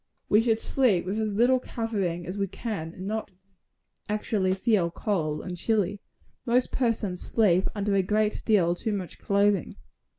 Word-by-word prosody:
We 210 - +5
should 225 -1 +1
sleep 225 -9 +2
with 195 +4 -2
as 215 -2 -1
little 250 +4 +4
covering 200 -9 -3
as 180 - -5
we 200 -1 -1
can, 195 -6 -5
and 185 - -7
not 215 +1 -3 0.8
actually 205 -3 0
feel 195 -4 +2
cold 165 -4 -2
and 180 - -5
chilly. 205 +1 0 0.4
Most 250 +1 +1
persons 220 -7 -1
sleep 190 -5 +2
under 205 0 0
a 195 - +4
great 210 +3 0
deal 185 -6 +3
too 215 +5 -3
much 190 -4 -5
clothing. 200 -2 +1
205 Hz, 160 wpm, -27 LUFS, 185-220 Hz, 0.8 s, We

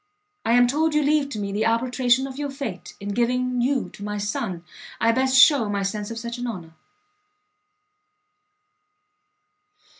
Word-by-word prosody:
I 230 - +1
am 245 0 +6
told 300 +5 +1
you 300 - +3
leave 290 -1 +2
to 230 - -6
me 200 -1 -3
the 210 +3 0
arbitration 245 +2 +1
of 270 +1 -8
your 290 -1 -2
fate, 250 -10 -7
in 200 - -6
giving 250 +3 0
you 260 +1 0
to 205 - -11
my 210 0 -3
son, 200 -3 -3 0.4
I 230 - +3
best 260 +2 +2
shew 255 -4 +6
my 200 -1 -1
sense 205 +1 -3
of 230 - -6
such 235 +1 -6
an 245 - -3
honour. 175 -8 -7
240 Hz, 160 wpm, -23 LUFS, 210-265 Hz, 0.4 s, am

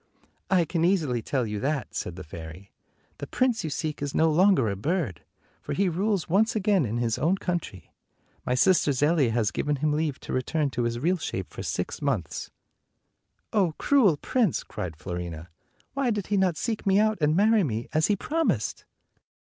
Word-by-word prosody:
" - - -42
I 180 -3 +3
can 165 +1 -1
easily 160 -10 +1
tell 130 +1 -1
you 105 -1 -3
that," 145 +3 -2
said 90 - -4
the 95 - -8
fairy. 80 +4 -10 0.5
"The - - -5
prince 250 -5 +1
you 160 - -2
seek 150 0 -3
is 145 -1 -3
no 160 0 +4
longer 180 - +4
a 100 - -1
bird, 140 - -2 0.4
for - - -4
he 195 -1 +1
rules 195 +2 0
once 210 +7 +2
again 205 - +2
in 110 +3 -2
his 115 -2 0
own 180 +5 +2
country. 170 - -4 0.5
My 125 - 0
sister 150 +1 +4
Zelia 145 0 +2
has 115 -2 +1
given 150 0 -1
him 150 +2 0
leave 150 -2 -1
to - - -6
return 140 +3 0
to 120 -1 -1
his 120 0 -1
real 175 +9 +1
shape - - -5
for - - -6
six - - -3
months." - - -2 1.0
"Oh, 185 -7 +2
cruel 225 - +4
prince!" 225 - 0
cried 85 -4 -6
Fiorina. 85 0 -6 0.4
"Why 275 -2 0
did 210 -4 -1
he 205 - -1
not 185 -4 +2
seek 225 -2 -2
me 195 0 +4
out 215 0 +2
and 150 +1 +3
marry 215 +2 +4
me, 115 -5 -2
as 155 0 +3
he 210 - +2
promised?" 325 - -1
155 Hz, 190 wpm, -26 LUFS, 120-195 Hz, 1.0 s, no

